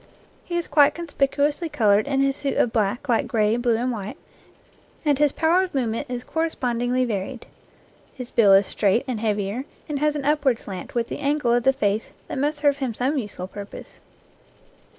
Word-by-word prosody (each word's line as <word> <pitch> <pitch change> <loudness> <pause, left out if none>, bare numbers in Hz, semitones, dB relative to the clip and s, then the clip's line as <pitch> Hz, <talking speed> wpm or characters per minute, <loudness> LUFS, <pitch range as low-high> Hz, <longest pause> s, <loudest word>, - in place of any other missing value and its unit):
He 345 - -3
is 345 - -2
quite 285 -1 +4
conspicuously 295 0 0
colored 210 -3 +3
in 275 -1 +1
his 275 0 +2
suit 280 -1 -2
of 225 - +2
black, 215 +1 0
light 235 -3 +1
gray, 220 -3 +2
blue, 240 -1 +1
and 250 +2 -1
white, 210 -3 -5 0.9
and 290 -2 +2
his 295 -2 +4
power 330 +5 +3
of 370 -5 -4
movement 230 -4 -1
is 245 -1 -4
correspondingly 250 -6 -1
varied. 225 +2 -4 0.7
His 250 -2 -7
bill 205 -4 +5
is 195 +1 +6
straight 205 +4 +1
and 245 -4 -2
heavier, 210 +2 -1 0.2
and 295 -2 -3
has 300 0 +1
an 285 -2 -3
upward 285 -4 +2
slant 190 -1 -8
with 235 -1 0
the - - -5
angle 285 -4 +1
of 240 - +3
the 265 - +4
face 210 -4 -1 0.2
that - - -3
must 295 +2 0
serve 285 -1 +2
him 255 -5 -2
some 270 +5 0
useful 205 -5 -6
purpose. 200 +1 -10
250 Hz, 190 wpm, -23 LUFS, 220-285 Hz, 0.9 s, is